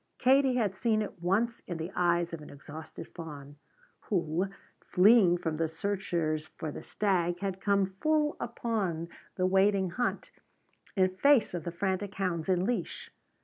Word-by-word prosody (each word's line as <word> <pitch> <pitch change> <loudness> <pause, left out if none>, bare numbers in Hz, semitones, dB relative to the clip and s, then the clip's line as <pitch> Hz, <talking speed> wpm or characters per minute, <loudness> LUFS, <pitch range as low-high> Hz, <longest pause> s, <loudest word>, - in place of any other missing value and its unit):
Katie 265 0 +4
had 215 -6 +1
seen 215 +1 +1
it 195 - -9
once 220 +7 +1
in 175 - -4
the 165 +3 -5
eyes 175 -1 +1
of 165 - -5
an 150 - -11
exhausted 150 +3 -9
fawn, 145 -4 -9 0.5
who, 175 -1 0 0.4
fleeing 190 -2 +5
from 160 -3 -3
the 165 0 +1
searchers 160 -3 -2
for 160 -2 -6
the - - -7
stag, 175 -4 0
had 190 -1 -3
come 200 -1 +3
full 300 +11 0
upon 205 -8 -2 0.3
the 185 - +1
waiting 190 0 +3
hunt 245 +7 -2 0.6
in 185 -2 +4
face 280 -6 +4
of 175 -3 -4
the 170 - -2
frantic 190 +3 -2
hounds 180 -3 -2
in 185 0 +2
leash. 225 -6 -3
185 Hz, 155 wpm, -30 LUFS, 170-205 Hz, 0.6 s, fleeing